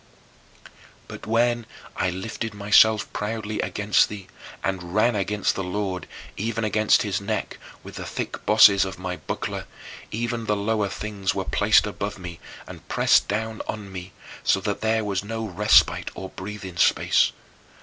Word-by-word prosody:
But - - -9
when 120 +1 +1 0.3
I - - 0
lifted 105 +4 -5
myself 105 +1 +4
proudly 105 0 -3
against 105 +1 +2
thee, 100 -3 -9 0.3
and 90 -1 -3
"ran 115 +2 +3
against 105 0 0
the 95 - -3
Lord, 95 0 -3 0.3
even 115 +2 -2
against 110 0 +3
his 100 -2 -2
neck, 100 - -3 0.2
with - - -10
the - - -5
thick - - -5
bosses 100 -2 +7
of 95 -1 -5
my 90 0 -4
buckler," - - -5 0.4
even 115 0 -3
the 105 - +2
lower 105 0 0
things 100 -1 -3
were - - -2
placed - - +4
above 100 +1 -4
me 90 -2 -8 0.3
and - - -12
pressed - - +3
down 110 +1 -2
on 105 -2 -5
me, 90 0 -7 0.3
so 95 - +3
that 100 0 -3
there 110 0 +1
was 100 -2 -1
no 115 +2 -4
respite 105 +1 +4
or 95 - -6
breathing 95 -2 -8
space. - - +3
105 Hz, 155 wpm, -24 LUFS, 95-110 Hz, 0.4 s, bosses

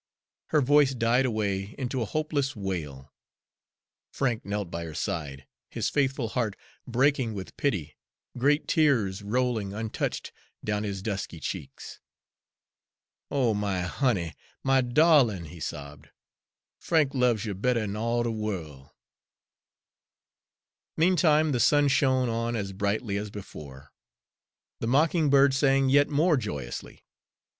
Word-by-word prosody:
Her 150 - +2
voice 140 0 +4
died 120 +2 +2
away 100 -2 -2
into 130 -1 -2
a - - 0
hopeless 145 -3 -1
wail. 80 -10 -5 1.0
Frank 125 -5 -1
knelt 100 -3 -4
by 85 - -4
her 80 -2 -8
side, 70 -4 -4 0.2
his - - -2
faithful 135 -4 0
heart 110 -4 -1 0.3
breaking 130 -2 +1
with 95 -2 -7
pity, 90 - -2 0.4
great 145 +5 +2
tears 115 - +2
rolling 110 -2 -1
untouched 110 0 -3 0.3
down 105 -1 -1
his 100 -3 -4
dusky 95 -5 -4
cheeks. - - -7 1.3
"Oh, 125 -5 +1
my 100 -3 -1
honey, 90 - 0 0.3
my 135 0 +3
darlin'," 125 - +4
he 80 +2 -11
sobbed, 75 -1 -7 0.7
"Frank 155 -5 +1
loves 125 -4 +2
you 105 - -3
better 115 +5 0
'n 105 -1 -3
all 115 +2 0
de 120 - -1
worl'." 85 -11 -5 2.0
Meantime 160 -3 +4
the 125 - 0
sun 145 +4 +4
shone 130 -2 +2
on 115 +1 -1
as 100 -3 -3
brightly 100 +2 -1
as 105 +1 -4
before, 75 -9 -10 0.9
the 115 - -3
mocking 155 +4 +3
bird 140 0 +5
sang 135 -1 +3
yet 145 +2 +4
more 155 +2 +3
joyously. 70 - -6
115 Hz, 125 wpm, -27 LUFS, 100-135 Hz, 2.0 s, bird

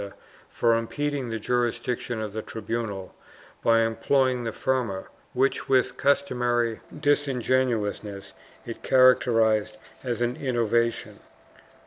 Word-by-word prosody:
IV] 100 - -5
CATALONIA 100 - -17 0.3
465 115 -1 0
for 145 - -1
impeding 145 -4 -1
the 115 0 -3
jurisdiction 120 0 -1
of 105 -2 -5
the 110 - -3
tribunal 110 -3 -5 0.5
by 115 0 +4
employing 125 +2 +1
the 115 - -2
firma, 120 -7 -1 0.3
which, 135 +2 0
with 130 -2 +2
customary 120 -4 +1 0.2
disingenuousness, 125 -8 0 0.3
it 115 - -7
characterized 115 -4 +3 0.3
as 120 -2 -2
an 120 +1 -1
innovation. 115 -2 0
120 Hz, 115 wpm, -26 LUFS, 110-130 Hz, 0.5 s, by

